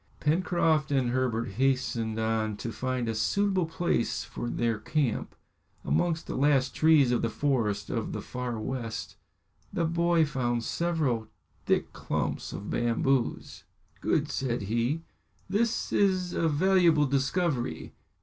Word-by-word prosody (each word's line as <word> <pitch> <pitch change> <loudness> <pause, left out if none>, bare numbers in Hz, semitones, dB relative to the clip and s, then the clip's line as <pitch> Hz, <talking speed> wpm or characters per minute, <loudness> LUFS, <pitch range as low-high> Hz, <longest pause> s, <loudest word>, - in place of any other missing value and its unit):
Pencroft 160 -2 +1
and 130 -3 +2
Herbert 125 -3 0
hastened 120 -1 0
on 110 -1 0
to 115 - -4
find 130 0 -2
a 115 - 0
suitable 190 - +1
place 165 -7 0
for 120 -1 -5
their 115 -3 0
camp. 135 +1 -1 0.5
Amongst 160 - +1
the - - -5
last 135 -2 +2
trees 155 -5 +5
of 120 - +1
the 115 - 0
forest 110 -6 0
of 115 -3 -2
the - - -4
Far 125 -2 -4
West, 115 -1 -4 0.5
the 175 -4 0
boy 170 0 +3
found 120 -5 -1
several 145 -9 0 0.4
thick - - +1
clumps - - -3
of 100 - -6
bamboos. 120 +2 0 0.4
"Good," - - 0
said 120 -5 -1
he; 120 +10 0 0.4
"this 230 +2 0
is 185 -3 +2
a 165 - +1
valuable 170 -1 +4
discovery." 135 - -1
130 Hz, 130 wpm, -28 LUFS, 115-160 Hz, 0.5 s, trees